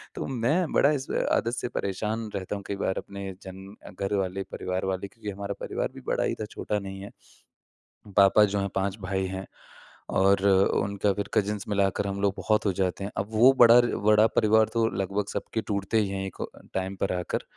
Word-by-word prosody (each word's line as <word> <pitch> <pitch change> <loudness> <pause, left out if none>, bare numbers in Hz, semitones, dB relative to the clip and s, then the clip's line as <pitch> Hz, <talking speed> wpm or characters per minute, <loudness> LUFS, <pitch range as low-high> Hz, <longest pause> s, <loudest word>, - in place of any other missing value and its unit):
तो - - -4
मैं 140 +7 0
बड़ा 145 - +5
इस 140 -2 -2 0.2
आदत 115 - +1
से - - -2
परेशान 105 +3 -3
रहता 100 +1 -3
हूँ 100 - -7
कई 100 - -2
बार 95 - -1
अपने 100 -1 -6
जन 95 0 -9 0.3
घर 100 +1 -2
वाले, 95 0 -2
परिवार 90 +1 -3
वाले 95 +1 -2
क्योंकि 105 +1 -8
हमारा 100 0 -4
परिवार - - -2
भी - - -9
बड़ा - - +1
ही - - -1
था, - - -2
छोटा 105 0 -3
नहीं 95 0 -7
है। 100 - -9 1.1
पापा 100 +2 +6
जो 100 0 0
हैं 100 - -1
5 95 +1 0
भाई 95 0 -2
हैं 95 +1 -5 0.7
और 95 0 +3
उनका 100 +1 +2
फिर 100 - -3
कज़िंस 105 -1 0
मिलाकर 100 0 +1
हम 100 0 -3
लोग 100 -1 +2
बहुत 110 0 +1
हो 95 - +3
जाते 95 +1 -1
हैं। 100 - -4
अब 100 - -1
वो 120 +5 +6
बड़ा 120 0 +8
बड़ा 110 -2 +3
परिवार 110 0 +4
तो 115 -1 +3
लगभग 100 +1 -1
सबके 110 - -3
टूटते 100 +2 0
ही 100 - 0
हैं 95 0 -3
एक 95 - -8 0.4
टाइम 95 +1 -2
पर 95 - -1
आकर 90 - -3
100 Hz, 200 wpm, -27 LUFS, 95-105 Hz, 1.1 s, बड़ा